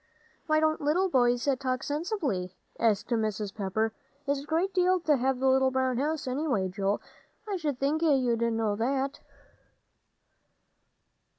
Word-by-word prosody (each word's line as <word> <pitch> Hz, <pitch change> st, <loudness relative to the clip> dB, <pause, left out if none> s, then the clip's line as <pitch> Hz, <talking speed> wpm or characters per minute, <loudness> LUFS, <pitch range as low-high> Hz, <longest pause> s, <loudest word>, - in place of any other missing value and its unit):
"Why 310 Hz, 0 st, +3 dB
don't 310 Hz, 0 st, +1 dB
little 340 Hz, +6 st, +2 dB
boys 245 Hz, -3 st, +2 dB
talk 255 Hz, -1 st, -2 dB
sensibly?" 285 Hz, -, -2 dB, 0.2 s
asked 215 Hz, -3 st, +1 dB
Mrs. 215 Hz, -3 st, -1 dB
Pepper. 215 Hz, +2 st, -1 dB, 0.3 s
"It's 280 Hz, -1 st, 0 dB
a -, -, -11 dB
great 340 Hz, +5 st, 0 dB
deal 365 Hz, 0 st, +3 dB
to 305 Hz, -3 st, +3 dB
have 260 Hz, +1 st, +1 dB
the 265 Hz, -, -1 dB
little 265 Hz, 0 st, +4 dB
brown 260 Hz, -1 st, 0 dB
house, 300 Hz, +2 st, -1 dB
anyway, 255 Hz, -8 st, 0 dB
Joel, 195 Hz, +2 st, -1 dB, 0.5 s
I 400 Hz, -2 st, -1 dB
sh'd 295 Hz, -6 st, -2 dB
think 285 Hz, +4 st, 0 dB
you'd 255 Hz, -7 st, +2 dB
know 225 Hz, -2 st, +1 dB
that." 270 Hz, +4 st, -1 dB
265 Hz, 140 wpm, -28 LUFS, 225-310 Hz, 0.5 s, little